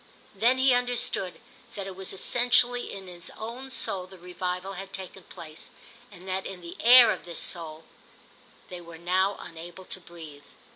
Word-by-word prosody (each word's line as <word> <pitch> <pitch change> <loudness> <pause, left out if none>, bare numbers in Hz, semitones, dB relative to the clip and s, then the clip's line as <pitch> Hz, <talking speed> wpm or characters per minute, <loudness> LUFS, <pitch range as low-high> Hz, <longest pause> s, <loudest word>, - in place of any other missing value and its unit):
Then 245 +3 +3
he 260 0 +5
understood 245 -7 0 0.4
that 200 - -4
it 195 -1 -7
was 190 0 -5
essentially 245 +4 +3
in 195 -1 -7
his 175 -1 -6
own 240 +5 -6
soul 195 -7 -3
the 190 0 -13
revival 180 +2 -4
had 195 +1 -8
taken 190 0 -7
place, 155 -2 -9 0.4
and 185 -1 -13
that 190 0 -2
in 185 -2 -8
the 170 0 -8
air 245 +1 +9
of - - -4
this 170 -2 -4
soul 160 -2 -2 0.9
they 180 -1 -7
were 170 -1 -11
now 185 +4 +1
unable 170 +3 -9
to 190 - -5
breathe. 160 -5 -12
190 Hz, 165 wpm, -28 LUFS, 175-225 Hz, 0.9 s, air